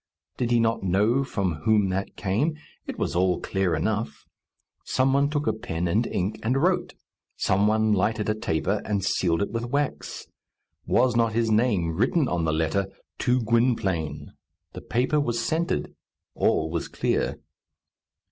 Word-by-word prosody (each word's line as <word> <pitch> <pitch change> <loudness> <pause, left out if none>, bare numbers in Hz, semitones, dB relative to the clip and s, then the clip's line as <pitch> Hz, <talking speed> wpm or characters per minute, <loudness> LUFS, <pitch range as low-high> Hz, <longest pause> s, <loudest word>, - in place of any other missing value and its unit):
Did 120 - -1
he 120 -1 +3
not 115 0 +1
know 105 +8 +2
from 95 - -2
whom 105 -2 +3
that 95 +2 -3
came? 125 - 0 0.3
It - - -5
was - - -2
all 90 0 +2
clear 95 -3 0
enough. 105 +1 -2 0.6
Some 130 +1 +1
one 140 +1 +3
took 150 0 -1
a 110 - +2
pen 90 -5 -3
and 110 +7 +1
ink, 100 +4 -2
and 125 +5 +1
wrote. 180 +6 +1 0.4
Some 100 +2 +2
one 110 0 +3
lighted 105 +2 0
a 110 - +2
taper, 100 -1 -1
and 100 -2 -1
sealed 85 -1 +1
it - - -4
with 115 0 -2
wax. 140 +2 -2 0.6
Was 125 -1 +3
not 115 -2 +2
his 115 0 +1
name 105 -8 +2
written 130 - +2
on 85 -5 -1
the 80 - +1
letter 80 +5 0 0.3
"To 125 -1 +2
Gwynplaine?" 100 - 0 0.4
The - - -7
paper 130 +6 +1
was 120 -5 -1
scented. 160 - -1 0.4
All 80 0 +1
was 85 -1 -2
clear. - - -1
110 Hz, 160 wpm, -25 LUFS, 95-120 Hz, 0.6 s, he